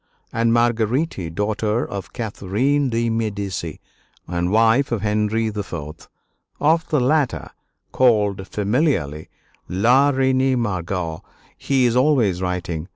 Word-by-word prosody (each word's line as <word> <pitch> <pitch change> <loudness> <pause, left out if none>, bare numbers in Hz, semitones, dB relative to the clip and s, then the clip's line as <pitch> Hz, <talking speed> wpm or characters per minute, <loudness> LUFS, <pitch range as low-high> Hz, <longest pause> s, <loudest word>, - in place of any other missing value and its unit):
and 115 0 +2
Marguerite, 115 - +1
daughter 105 +3 0
of 100 -3 -7
Catherine 120 +6 -1
de' 115 0 0
Medici 100 -7 -3 0.5
and 90 0 -1
wife 115 +5 +3
of 110 -4 -1
Henry 105 +1 0
IV. 85 -7 -7 0.5
Of 160 +2 +2
the 150 - +2
latter, 140 +2 0 0.4
called 105 -6 +2
familiarly 105 - -1 0.4
"La 120 +10 +4
Reine 130 -1 +2
Margot," 90 -6 -3 0.3
he 135 -2 +1
is 120 -1 +2
always 125 -9 +2
writing. 90 -3 -3
110 Hz, 110 wpm, -21 LUFS, 95-130 Hz, 0.5 s, La